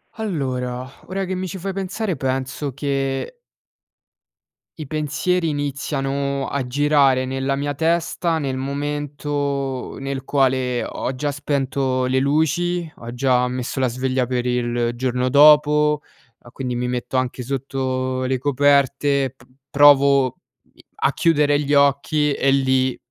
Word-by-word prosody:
Allora, 130 - -3 0.2
ora 195 +2 -3
che 185 0 -3
mi 185 +1 -3
ci 185 - -6
fai 195 +2 -4
pensare 195 0 -3
penso 135 +1 -3
che 135 - -2 1.4
i 155 -3 -7
pensieri 160 +4 -1
iniziano 140 -1 -2
a 140 -2 -2
girare 135 0 +3
nella 135 +1 -2
mia 145 +1 -2
testa 165 +2 0
nel 135 -3 -2
momento 140 -1 -3
nel 135 -1 -4
quale 130 -3 +1
ho 130 - -4
già 145 +3 -2
spento 135 -2 -1
le 130 +1 +1
luci, 160 +5 0
ho 120 0 -8
già 125 -1 +2
messo 125 +1 -3
la 130 - +2
sveglia 130 +1 -1
per 125 0 -2
il 120 -1 0
giorno 125 0 -1
dopo, 150 +1 +5 0.4
ehm, 120 - -16
quindi 125 -2 -4
mi 125 +1 -2
metto 125 +1 -2
anche 130 0 -2
sotto 130 0 -2
le 130 0 0
coperte, 140 0 +2
p 125 - -21 0.3
provo 140 -2 +5 0.4
i - - -21 0.2
a - - +4
chiudere 145 -3 +2
gli 145 0 -1
occhi 140 +1 +3
e 135 0 +1
lì, 130 -1 +2
140 Hz, 135 wpm, -21 LUFS, 130-145 Hz, 1.4 s, dopo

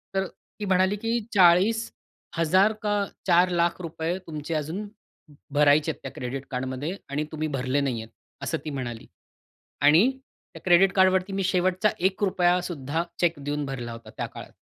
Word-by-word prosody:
तर 190 0 +1
ती 210 - -11
म्हणाली, 190 +1 +3
की 225 +3 -1 0.2
"₹40,000 185 -1 +2
का 205 -1 +1 0.2
₹4,00,000 175 -1 +3
रुपये 165 +1 -3
तुमचे 155 0 -5
अजून 165 +8 -3 0.7
भरायचे 150 +2 +4
आहेत - - -13
त्या 135 - -6
क्रेडिट 130 +2 -5
कार्डमध्ये 130 +6 -3
आणि 145 +2 -1
तुम्ही 155 0 -2
भरले 130 +2 0
नाही 125 -5 -1
आहेत." 110 - -15 0.3
असं 140 +5 -1
ती - - -3
म्हणाली. 125 -5 -5 0.7
आणि 160 - +6 0.4
त्या - - -11
क्रेडिट 185 +2 +5
कार्डवरती 190 0 +3
मी 195 0 -1
शेवटचा 185 +2 +2 0.2
₹1 185 -2 +2
सुद्धा 160 -1 -2 0.2
चेक 175 -2 +3
देऊन 145 +1 -3
भरला 125 -4 -5
होता 115 0 -10
त्या - - -2
काळात. - - -11
170 Hz, 150 wpm, -26 LUFS, 145-190 Hz, 0.7 s, आणि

